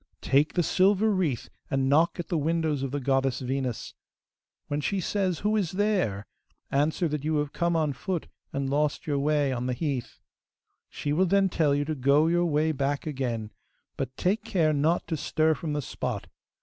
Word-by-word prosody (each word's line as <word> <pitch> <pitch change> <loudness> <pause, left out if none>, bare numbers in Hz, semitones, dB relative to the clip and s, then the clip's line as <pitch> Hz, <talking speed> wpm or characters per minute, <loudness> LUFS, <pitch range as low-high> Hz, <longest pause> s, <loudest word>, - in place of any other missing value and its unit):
Take 140 +3 +2
the 175 - +3
silver 200 +5 +3
wreath 170 - 0 0.2
and 135 0 +1
knock 160 +6 +3
at 175 - -4
the 170 - +1
windows 160 -2 0
of 135 - -2
the 145 +2 -2
goddess 135 -1 +1
Venus. 130 -2 -3 0.7
When 145 +1 -1
she 195 +6 -1
says, 185 -2 -1
"Who 210 +1 +1
is 195 -6 0
there?" 185 - 0 0.5
answer 155 +5 +1
that 150 -2 -3
you 155 +1 0
have 145 -1 -1
come 170 0 0
on 155 -3 +1
foot 175 +5 -3 0.3
and 140 -1 -2
lost 145 +2 0
your 145 -2 0
way 145 -1 +2
on 125 -1 -2
the 125 - 0
heath. 135 -3 -3 0.7
She 145 - -3
will 185 +5 +3
then 195 +1 +3
tell 155 -5 +2
you 145 0 0
to 155 - -2
go 140 +2 +3
your 175 +1 +2
way 155 0 +2
back 140 0 -1
again; 120 -7 -3 0.4
but 130 -1 -4
take 205 +5 +1
care 170 -9 +2
not 155 +4 +1
to 165 - -2
stir 155 +1 +1
from 155 0 -4
the 145 -1 -2
spot. - - -4
150 Hz, 190 wpm, -27 LUFS, 135-170 Hz, 0.7 s, the